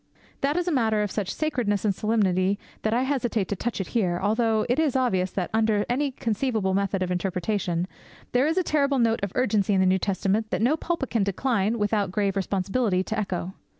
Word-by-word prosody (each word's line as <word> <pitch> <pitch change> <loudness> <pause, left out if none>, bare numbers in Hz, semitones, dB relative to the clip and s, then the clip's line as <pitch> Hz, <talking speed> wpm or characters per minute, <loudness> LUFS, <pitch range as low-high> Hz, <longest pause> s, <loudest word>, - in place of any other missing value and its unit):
That 285 +4 +1
is 355 0 -1
a - - +2
matter 220 -6 +2
of 205 - -3
such 195 -3 -2
sacredness 240 -10 -1
and 205 - +3
solemnity 195 -2 +1 0.2
that 220 - 0
I 240 +3 +2
hesitate 240 -7 0
to 200 - -1
touch 235 +4 -3
it 190 - -3
here; 180 -7 0
although 220 +1 +1
it 245 +5 +1
is 305 -5 +1
obvious 190 -8 +1
that, 185 -3 -2
under 220 -2 +2
any 275 +4 0
conceivable 225 -5 -1
method 195 -1 0
of 180 - -3
interpretation, 180 -1 -1 0.4
there 255 +4 +3
is 320 - 0
a 370 - +3
terrible 285 -3 +1
note 230 -2 +2
of 200 -2 -2
urgency 210 -5 +2
in - - +3
the 190 - +4
New 185 +1 +3
Testament 200 +3 0
that - - -1
no 265 +6 +4
pulpit 320 -4 -3
can 225 -4 +2
decline, 215 +1 0
without 205 -2 0
grave 200 0 0
responsibility, 195 +1 0
to 220 +3 -3
echo. 190 -2 -3
215 Hz, 210 wpm, -25 LUFS, 190-245 Hz, 0.4 s, the